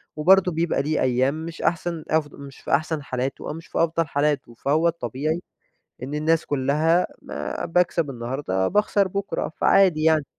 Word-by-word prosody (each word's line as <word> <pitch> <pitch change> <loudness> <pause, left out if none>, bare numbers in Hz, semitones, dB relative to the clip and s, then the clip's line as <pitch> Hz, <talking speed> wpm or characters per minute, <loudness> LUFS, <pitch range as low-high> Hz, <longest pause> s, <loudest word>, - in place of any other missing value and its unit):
وبرضو 185 +4 +4
بيبقى 165 -2 0
ليه 150 +2 -1
أيّام 130 +5 +1
مش 165 0 -8
أحسن 170 -1 -1
أف 155 -1 +2
مش 140 -1 -11
في - - -7
أحسن 155 +1 0
حالاته 130 +1 -4
أو - - -3
مش 165 +1 -10
في - - -6
أفضل 165 -1 +1
حالاته، 145 -3 -1
فهو 150 +8 +1
الطبيعي 155 +1 -2 0.6
إن 135 +3 -5
الناس 155 +2 +1
كلّها 150 +5 +2 0.2
ما 75 +2 -5
باكسب 170 -3 +1
النهارده 120 -6 -2
باخسر 205 -1 +2
بُكرة، 200 +2 -3
فعادي 185 -6 +4
يعني. 155 -2 +3
155 Hz, 160 wpm, -23 LUFS, 140-165 Hz, 0.6 s, وبرضو